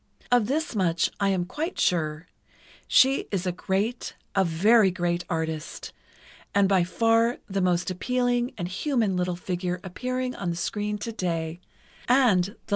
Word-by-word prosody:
Of 245 -4 +4
this 305 +3 -1
much 170 -4 +1
I 200 -1 +2
am 185 -2 0
quite 310 - -4
sure: 155 -2 0 0.6
She 270 +1 +4
is 195 -2 -2
a 180 - +1
great, 195 +7 -2 0.2
a 195 - +3
very 195 +5 +4
great 175 -1 -1
artist, 160 -1 -4 0.6
and 200 -1 +5
by 190 -2 +3
far 230 +5 +2
the 195 -1 -1
most 180 0 +1
appealing 245 +5 0
and 175 -3 -3
human 215 +1 0
little 180 0 -1
figure 180 0 -3
appearing 255 +6 -3
on 185 -7 -4
the 170 - -2
screen 210 +4 -2
today—and 185 +3 0
the - - -5
loveliest. 210 - -18
190 Hz, 150 wpm, -26 LUFS, 175-235 Hz, 0.6 s, and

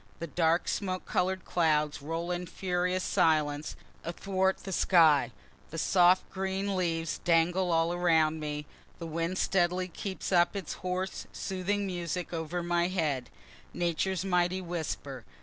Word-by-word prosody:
The 170 - -4
dark 165 +2 +1
smoke 185 -2 -2
color'd 185 +1 0
clouds 150 -4 +1
roll 165 +4 -3
in 180 0 -3
furious 180 +1 -1
silence 150 -2 +1 0.3
athwart 190 +2 0
the 195 - -6
sky; 160 -7 +4 0.4
the 165 - -7
soft 180 +2 +4
green 195 +1 -2
leaves 165 -3 -1
dangle 175 +2 +2
all 165 +1 +2
around 160 -3 +2
me; 150 -1 -4 0.3
the 170 - -6
wind 165 +3 -2
steadily 180 -1 +1
keeps 190 +3 -5
up 175 +1 +4
its 195 -5 -4
hoarse, 185 +1 -3
soothing 195 +1 -2
music 175 -1 -3
over 165 +1 -3
my 175 0 +1
head 150 -9 -1 0.5
Nature's 175 +2 0
mighty 180 0 +1
whisper. 160 -7 -5
175 Hz, 135 wpm, -30 LUFS, 165-185 Hz, 0.5 s, sky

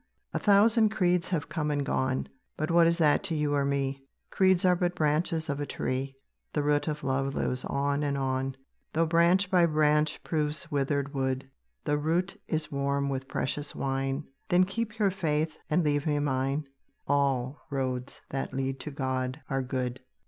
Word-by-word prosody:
A - - 0
thousand 215 +2 +5
creeds 180 -4 +1
have 165 -6 -1
come 150 -2 -2
and 145 -1 0
gone; 130 -2 0 0.3
But 155 +2 -1
what 170 0 +6
is 170 0 +2
that 155 -4 +4
to 170 -4 -2
you 150 -1 +1
or 140 -1 +2
me? 140 -1 -1 0.3
Creeds 190 -1 +3
are 180 -1 +5
but 175 0 0
branches 160 +1 +1
of 140 -1 -2
a 145 - -1
tree, 135 +1 -2 0.4
The 150 - +1
root 145 +1 +2
of 150 -1 -3
love 135 0 0
lives 125 0 -1
on 140 +1 0
and 140 -1 0
on. 135 0 -1 0.4
Though 165 +1 +3
branch 170 +4 +3
by 175 -2 +5
branch 150 -1 +2
proves 150 -2 -2
withered 140 0 0
wood, 130 -1 -1 0.4
The 145 0 +1
root 170 +5 -1
is 155 -1 -2
warm 140 0 0
with 135 -1 -3
precious 145 +2 -3
wine; 135 +1 -1 0.3
Then 180 -1 +5
keep 215 +3 -3
your 205 -3 +3
faith, 155 -4 0
and 165 +3 +3
leave 145 0 +1
me 150 -1 +2
mine; 140 +1 0 0.4
All 140 -1 +1
roads 130 -2 -3
that 135 0 -3
lead 135 0 -2
to - - -5
God 130 -1 -2
are 135 0 +1
good. 125 -1 -2
145 Hz, 180 wpm, -29 LUFS, 135-165 Hz, 0.4 s, what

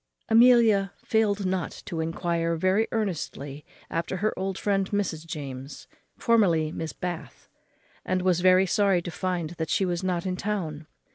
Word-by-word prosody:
Amelia 225 -4 +5
failed 210 -3 +1
not 185 -2 -2
to 165 - -4
enquire 165 +1 -1
very 185 +6 +2
earnestly 150 -9 -3 0.2
after 165 +3 -3
her 215 +4 0
old 190 0 -3
friend 195 -2 0
Mrs. 175 -6 -2
James, 140 -4 -7 0.3
formerly 175 -9 +3
Miss 160 0 -4
Bath, 175 -2 -6 0.6
and 185 -1 -1
was 180 -2 +3
very 185 +1 +5
sorry 190 -2 +2
to 175 - -5
find 180 -2 -2
that 160 -1 -2
she 195 - +2
was 175 0 -2
not 180 -2 -1
in 185 -1 -2
town. 165 -7 -3
185 Hz, 150 wpm, -26 LUFS, 165-200 Hz, 0.6 s, Amelia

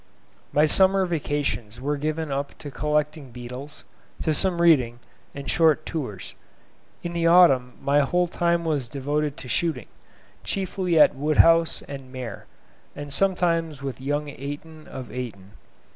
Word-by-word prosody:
My 150 +1 +4
summer 190 +4 +4
vacations 145 - -2
were 145 +3 -1
given 155 +1 -3
up 140 +1 -3
to 145 - -8
collecting 150 0 -1
beetles, 125 +5 -9 0.4
to 155 - +1
some 180 +2 +1
reading, 135 -9 +4 0.4
and 140 -1 -7
short 155 -2 +3
tours. 125 - -5 0.7
In 170 - -4
the 170 -1 +1
autumn 140 -8 +5
my 140 +1 +2
whole 175 +6 +2
time 170 -1 0
was 145 -7 -1
devoted 145 +2 -2
to - - -7
shooting, 145 -4 -1 0.6
chiefly 185 -3 0
at - - +7
Woodhouse 165 +3 +3
and 135 -2 -9
Maer, 130 -3 -7 0.5
and 145 -1 -5
sometimes 165 -4 0
with 130 -2 -5
young 145 +2 -2
Eyton 145 +3 -8
of 130 -2 -8
Eyton. 105 -7 -7
150 Hz, 140 wpm, -24 LUFS, 135-165 Hz, 0.7 s, at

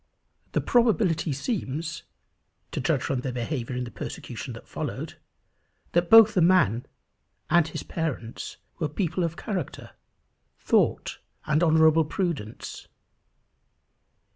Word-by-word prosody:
The - - +2
probability 210 -9 +2
seems, 155 - -3 0.7
to - - -3
judge - - +1
from 135 - -1
their 130 - -3
behaviour 125 0 -3
in 125 - -2
the 120 - -7
persecution - - -6
that - - -12
followed, - - -5 0.7
that 175 0 +1
both 225 -1 +9
the 180 - +3
man 165 - +3 0.6
and 170 -2 +5
his 155 - -6
parents 140 -9 -4 0.2
were 155 -4 0
people 180 -2 -1
of 165 -1 -2
character, 185 - -5 0.7
thought, - - +1 0.3
and 150 +1 +2
honourable 160 -1 +5
prudence. 150 - -4
160 Hz, 115 wpm, -26 LUFS, 135-180 Hz, 0.7 s, both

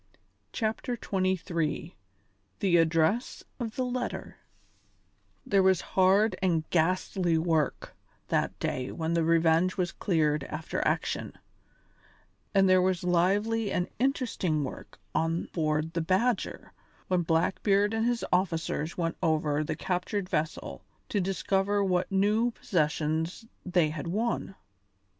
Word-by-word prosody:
CHAPTER 225 +2 -2
XXIII 180 -6 -2 0.6
THE 185 -3 +3
ADDRESS 165 +8 +1 0.2
OF 230 -3 -4
THE 255 - 0
LETTER 250 0 -4 1.1
There 195 -1 +3
was 190 -1 +4
hard 190 +2 +4
and 165 -4 +1
ghastly 175 0 +1
work 160 -3 0 0.3
that - - 0
day 130 0 -2
when 160 0 -2
the 170 -1 +2
Revenge 165 +3 +3
was 180 -2 0
cleared 155 -5 +1
after 155 +2 -3
action, - - -1 1.2
and 195 -1 +4
there 185 0 +5
was 185 -1 +1
lively 200 +5 +1
and 180 - 0
interesting 235 - 0
work 130 - -8 0.2
on 165 +1 0
board 155 0 0
the 170 - 0
Badger 190 +7 0 0.3
when 180 -1 +2
Blackbeard 195 +5 +2
and 225 +1 +1
his 240 -1 0
officers 165 -3 0
went 165 -2 -1
over 155 -2 +1
the - - -3
captured 185 +2 -2
vessel 155 -2 -3 0.3
to 205 - 0
discover 195 +3 0
what 185 -1 0
new 210 +5 +2
possessions 160 -1 -1 0.2
they 175 -4 +2
had 155 +1 -5
won. 210 +1 -2
180 Hz, 120 wpm, -28 LUFS, 160-200 Hz, 1.2 s, there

